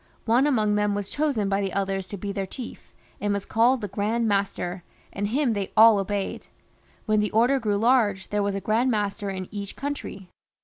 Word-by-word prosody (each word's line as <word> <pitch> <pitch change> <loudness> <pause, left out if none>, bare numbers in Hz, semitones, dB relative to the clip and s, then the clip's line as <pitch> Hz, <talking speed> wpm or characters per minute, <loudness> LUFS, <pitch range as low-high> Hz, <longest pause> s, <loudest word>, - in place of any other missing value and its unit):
One 240 +5 +3
among 215 -7 +2
them 210 -1 +1
was 205 -1 -4
chosen 285 -9 0
by 195 0 +1
the 195 -2 -2
others 195 -1 -1
to 200 - -6
be 200 +1 -4
their 195 -1 -3
chief, 245 +4 -9 0.3
and 205 - -1
was 200 -1 -2
called 240 +3 +3
the 205 - -3
Grand 215 +4 -1
Master, 195 -3 -1 0.3
and 205 +1 -2
him 255 +2 +1
they 200 -2 -3
all 220 -1 +8
obeyed. 195 0 -3 0.6
When 215 -1 +2
the 210 0 +1
Order 245 +5 +3
grew 210 -4 0
large 215 -4 +2
there 210 0 0
was 200 -1 -1
a 195 - -3
Grand 230 +5 +1
Master 205 -2 -1
in 185 -1 -5
each 200 -1 -6
country. 245 -10 -6
205 Hz, 205 wpm, -25 LUFS, 195-230 Hz, 0.6 s, all